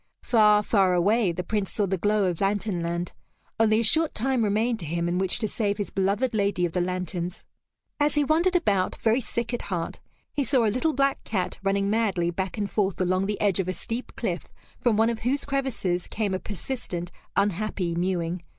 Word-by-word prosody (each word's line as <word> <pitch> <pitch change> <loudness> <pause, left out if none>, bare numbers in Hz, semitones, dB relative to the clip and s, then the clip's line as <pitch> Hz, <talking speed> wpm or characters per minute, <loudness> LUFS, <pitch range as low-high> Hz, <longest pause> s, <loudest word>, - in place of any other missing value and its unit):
Far, 210 -3 +5
far 195 -4 +3
away, 200 +2 +3
the 175 +2 -4
Prince 205 0 -1
saw 210 - +1
the 190 0 0
glow 205 +3 +1
of 180 -1 -1
Lantern 200 -2 0
Land. 170 +1 -3 0.5
Only 220 0 +4
a - - 0
short 315 +8 +3
time 255 0 +1
remained 220 +3 +1
to 165 - -6
him 170 +2 -1
in 175 +1 0
which 190 -1 +1
to 220 - -1
save 205 -1 -1
his 205 - -3
beloved 200 +6 0
lady 200 -4 +1
of 170 - -2
the 180 - 0
lanterns. 180 0 -3 0.5
As 295 0 +2
he 295 - +3
wandered 335 +5 +2
about, 200 - +2
very 230 +3 +2
sick 235 0 -3
at 240 - -1
heart, 175 -4 -4 0.3
he 290 - 0
saw 255 -4 +3
a 210 - +2
little 305 +6 +1
black 275 +1 +1
cat 190 -5 -2
running 195 0 +1
madly 200 -5 +1
back 190 +3 -3
and 205 -1 -1
forth 195 -2 -1
along 185 +1 +1
the 205 0 -2
edge 200 -2 +2
of 185 - 0
a 185 - -1
steep 230 +6 -5
cliff - - -2 0.3
from 235 -5 +2
one 225 +1 +4
of 230 - -4
whose 265 +5 -1
crevices 260 -11 -1
came 205 -3 -2
a 185 - -1
persistent, 190 -5 -5 0.2
unhappy 200 -2 0
mewing. 175 0 -1
205 Hz, 205 wpm, -26 LUFS, 185-230 Hz, 0.5 s, Far